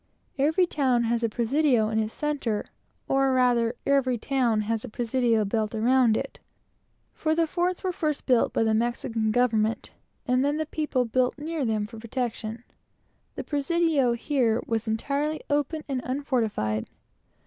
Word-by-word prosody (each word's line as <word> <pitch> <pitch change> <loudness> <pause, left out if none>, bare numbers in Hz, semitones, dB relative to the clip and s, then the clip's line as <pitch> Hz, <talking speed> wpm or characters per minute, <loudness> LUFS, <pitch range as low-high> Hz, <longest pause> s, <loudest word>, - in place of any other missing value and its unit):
Every 315 +6 +3
town 260 -7 +1
has 235 0 0
a 230 - +1
presidio 240 0 +2
in 220 0 0
its 220 0 -2
centre; 280 -8 -2 0.4
or 270 0 +2
rather, 245 -2 +2
every 270 -3 +2
presidio 235 -4 0
has 225 -1 -1
a - - -6
town 230 -1 +1
built 215 0 -1
around 235 0 +3
it; - - -5 0.7
for 315 0 0
the 330 0 +3
forts 355 +2 -1
were 375 - 0
first 305 -4 -2
built 250 -3 +3
by - - +1
the 220 -1 +2
Mexican 230 -1 0
government, 225 -1 +1 0.3
and 255 0 +2
then 290 +2 +1
the 315 - -1
people 300 -5 -1
built 250 +3 0
near 310 0 -3
them 215 -2 0
for 225 +1 -10
protection. 230 -1 -4 0.7
The - - -4
presidio 295 -3 +1
here 235 -2 +1
was 225 0 -2
entirely 280 +7 -1
open 295 +2 0
and 265 -3 -2
unfortified. 225 - -1
250 Hz, 155 wpm, -26 LUFS, 225-285 Hz, 0.7 s, Every